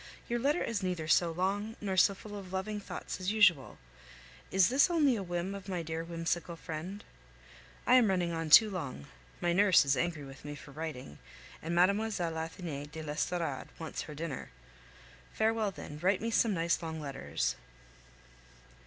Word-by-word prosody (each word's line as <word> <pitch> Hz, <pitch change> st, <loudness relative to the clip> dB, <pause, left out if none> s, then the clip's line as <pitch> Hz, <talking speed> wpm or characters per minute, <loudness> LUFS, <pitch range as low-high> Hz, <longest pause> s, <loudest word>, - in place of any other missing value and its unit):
Your 240 Hz, 0 st, -1 dB
letter 285 Hz, +7 st, +1 dB
is 220 Hz, -3 st, -2 dB
neither 180 Hz, -4 st, -2 dB
so 170 Hz, +1 st, +4 dB
long 200 Hz, +6 st, -1 dB
nor 195 Hz, -2 st, -2 dB
so 195 Hz, +2 st, +5 dB
full 205 Hz, +1 st, -9 dB
of 190 Hz, -3 st, -8 dB
loving 205 Hz, +3 st, -2 dB
thoughts 200 Hz, -, -6 dB
as 185 Hz, +2 st, -1 dB
usual. 185 Hz, -10 st, +4 dB, 0.7 s
Is 190 Hz, +1 st, +4 dB
this 270 Hz, +7 st, +4 dB
only 300 Hz, -7 st, +3 dB
a 210 Hz, -, -3 dB
whim 175 Hz, +1 st, -3 dB
of 200 Hz, -1 st, -8 dB
my 180 Hz, -3 st, -2 dB
dear 160 Hz, +1 st, -3 dB
whimsical 170 Hz, +1 st, -2 dB
friend? 165 Hz, +5 st, -6 dB, 0.8 s
I -, -, +4 dB
am 235 Hz, -5 st, +5 dB
running 180 Hz, -3 st, +1 dB
on 165 Hz, -1 st, -3 dB
too 215 Hz, +7 st, +8 dB
long. 140 Hz, -, -5 dB, 0.4 s
My 175 Hz, 0 st, +2 dB
nurse 195 Hz, -4 st, +6 dB
is 135 Hz, 0 st, +3 dB
angry 160 Hz, +2 st, -1 dB
with 135 Hz, 0 st, -11 dB
me 145 Hz, 0 st, -6 dB
for 145 Hz, -, -12 dB
writing, 135 Hz, -, -6 dB, 0.4 s
and 165 Hz, +2 st, -3 dB
Mlle. 175 Hz, -, +6 dB, 0.2 s
Athenais 165 Hz, -7 st, -3 dB
de 160 Hz, +2 st, -8 dB
l'Estorade 150 Hz, -1 st, -2 dB
wants 160 Hz, -1 st, -5 dB
her 150 Hz, -, -8 dB
dinner. 155 Hz, -3 st, -5 dB, 0.8 s
Farewell, 220 Hz, -1 st, +1 dB
then; 150 Hz, -5 st, -9 dB
write 190 Hz, +2 st, +3 dB
me 230 Hz, +1 st, -2 dB
some 225 Hz, -2 st, +3 dB
nice 170 Hz, +1 st, +1 dB
long 160 Hz, -1 st, -4 dB
letters. 140 Hz, -3 st, -2 dB
175 Hz, 170 wpm, -32 LUFS, 160-200 Hz, 0.8 s, too